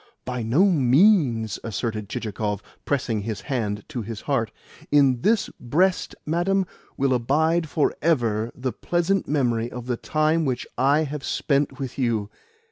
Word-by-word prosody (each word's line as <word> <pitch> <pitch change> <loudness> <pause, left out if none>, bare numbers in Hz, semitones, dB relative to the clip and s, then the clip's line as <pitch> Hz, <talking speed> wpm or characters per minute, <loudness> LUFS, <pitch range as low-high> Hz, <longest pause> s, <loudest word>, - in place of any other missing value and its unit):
"By 125 -1 -3
no 125 - +3
means," 135 - +3
asserted 110 -1 -3
Chichikov, 105 -2 -3 0.2
pressing 120 -6 0
his 110 0 -4
hand 105 -7 -3
to 120 - -4
his 110 0 -6
heart. 125 -7 0 0.4
"In 135 -4 +4
this 220 - +2
breast, 175 +10 +1
madam, 185 +5 +1 0.3
will 135 -1 +2
abide 155 +7 +1
for 150 -1 +1
ever 120 -8 +1
the 125 -1 -3
pleasant 175 - 0
memory 120 -5 0
of 125 -1 -7
the 125 -1 -2
time 155 +4 +1
which 130 -4 -1
I 140 +4 +3
have 150 -1 -5
spent 140 -2 0
with 135 -1 -5
you. 115 -5 0
130 Hz, 145 wpm, -24 LUFS, 115-155 Hz, 0.4 s, In